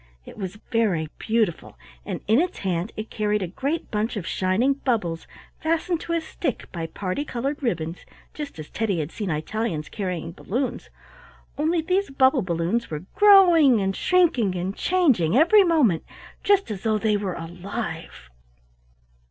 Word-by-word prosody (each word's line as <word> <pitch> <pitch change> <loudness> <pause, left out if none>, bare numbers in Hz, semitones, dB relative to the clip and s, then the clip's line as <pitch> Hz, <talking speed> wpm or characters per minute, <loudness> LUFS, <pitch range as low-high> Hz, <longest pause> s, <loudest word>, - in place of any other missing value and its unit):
It - - -11
was 195 0 -6
very 195 -10 +1
beautiful, 220 -6 -1 0.3
and - - -4
in 225 +7 +5
its 360 - -2
hand 185 +1 -2
it 215 +1 -6
carried 210 -1 0
a - - -2
great 280 - -3
bunch 220 +2 -1
of 185 - -4
shining 190 +12 +1
bubbles, 220 -12 -2 0.3
fastened 330 +1 0
to 335 - -4
a 335 - +1
stick 315 -4 -4
by 165 -2 -4
parti 190 - -3
colored 275 +2 -3
ribbons, 170 - -2 0.3
just 295 - -7
as 155 -1 -9
Teddy 210 -5 -1
had 155 0 -3
seen 205 -4 -4
Italians 160 +1 -2
carrying 180 -5 -4
balloons, 245 +9 -3 0.7
only 320 +3 +1
these 375 +4 0
bubble 265 0 +3
balloons 175 +6 -1
were 155 +2 -5
growing 350 - +7
and 195 -1 -1
shrinking 285 - +2
and 185 +3 -3
changing 260 - +2
every 360 +7 +6
moment, 295 - +3 0.4
just 395 - +3
as 195 -3 -5
though 220 -1 +1
they 210 0 +1
were 200 -3 -2
alive. 165 - -6
215 Hz, 155 wpm, -24 LUFS, 180-290 Hz, 0.7 s, growing